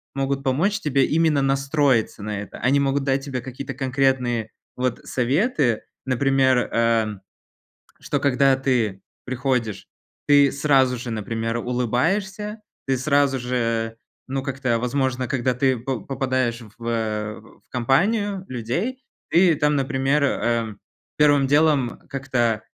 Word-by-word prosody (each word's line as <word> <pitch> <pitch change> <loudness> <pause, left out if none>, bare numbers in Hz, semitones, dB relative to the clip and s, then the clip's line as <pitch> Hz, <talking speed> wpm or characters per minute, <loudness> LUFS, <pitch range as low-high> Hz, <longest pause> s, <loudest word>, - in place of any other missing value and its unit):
могут 135 0 -1
помочь 170 +11 +1
тебе 135 -5 +2
именно 155 -2 +2
настроиться 135 -5 +1
на 105 -1 -3
это. 100 - -9
Они 135 +3 +2
могут 140 0 +1
дать 135 0 0
тебе 130 -3 -4
какие-то 130 +2 -7
конкретные, 130 -4 0 0.3
вот, 125 -1 -2
советы, 135 - +1 0.2
например, 130 0 +3 0.2
э, 115 -1 +3 0.9
что 145 - -2
когда 135 -1 +3
ты 120 -7 0 0.2
приходишь, 125 -6 -2 0.4
ты 145 -2 +6
сразу 135 -3 +2
же, 120 0 -6
например, 115 +2 -2
улыбаешься, 190 - -1 0.3
ты 135 -1 +1
сразу 140 0 +2
же, 115 -2 -1 0.3
ну, 135 +1 -2
как-то, 130 -3 -1
возможно, 130 +1 -1
когда 130 -1 0
ты 130 +1 +1
по 125 0 -3
попадаешь 130 -3 -1 0.2
в 115 - -13 0.8
в - - -40
компанию 190 - +1
людей, 130 - -3 0.3
ты 175 -1 +5
там, 150 0 +1
например, 135 +1 +1
э, 115 -5 0 0.4
первым 145 -2 +4
делом 145 -4 +2
как-то, 120 -5 -1
135 Hz, 125 wpm, -23 LUFS, 120-140 Hz, 0.9 s, ты